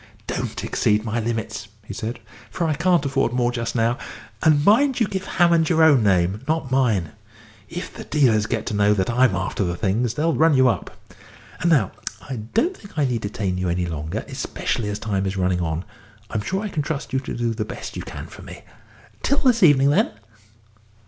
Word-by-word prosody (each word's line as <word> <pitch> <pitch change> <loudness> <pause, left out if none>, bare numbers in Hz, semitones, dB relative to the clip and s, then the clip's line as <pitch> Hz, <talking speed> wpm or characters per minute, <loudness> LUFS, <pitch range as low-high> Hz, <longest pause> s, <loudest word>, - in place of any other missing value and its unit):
"Don't - - -4
exceed 105 +1 +1
my 115 +1 -1
limits," 110 -2 -3 0.2
he 105 - -7
said, 115 +2 -4 0.3
"for 170 - -2
I 155 - +1
can't 170 0 +2
afford 135 -3 +1
more 125 -1 +1
just 115 -1 -3
now; 115 +1 +1 0.4
and 150 -2 +4
mind 255 +5 +4
you 225 - +4
give 190 -2 -4
Hammond 170 -3 +3
your 160 -2 +4
own 145 -6 +6
name, 95 0 +2
not 155 -4 -1
mine. 115 - +2 0.6
If 175 - -6
the - - -8
dealers 115 -8 +2
get 115 -1 -2
to 115 - -3
know 105 0 +3
I'm 120 -3 +3
after 95 +2 -2
the 85 -1 -1
things, 110 +5 0
they'll 160 +3 +1
run 155 +4 +4
you 130 -1 +5
up. 120 - 0 0.7
And 170 - +1
now, 135 - +3 0.4
I 130 - -4
don't 225 - 0
think 200 - -15
I 145 - +3
need 120 -4 -1
detain 100 -3 -2
you 90 -1 -1
any 90 +1 0
longer, 80 -2 -4
especially 105 -3 -3
as 105 - -2
time 100 -3 -1
is 95 +1 -3
running 90 -1 +1
on. 80 +1 -2 0.5
I'm 110 - -1
sure 190 - -2
I 210 - -3
can 155 - -2
trust 145 -2 -4
you 135 - +2
to 130 - -6
do 120 -1 0
the 110 -1 -2
best 105 - -7
you - - -4
can - - -7
for - - -12
me. - - -11 0.6
Till 280 - +1
this 250 -5 +3
evening, 140 -5 +6
then." - - +3
120 Hz, 205 wpm, -22 LUFS, 105-155 Hz, 0.7 s, own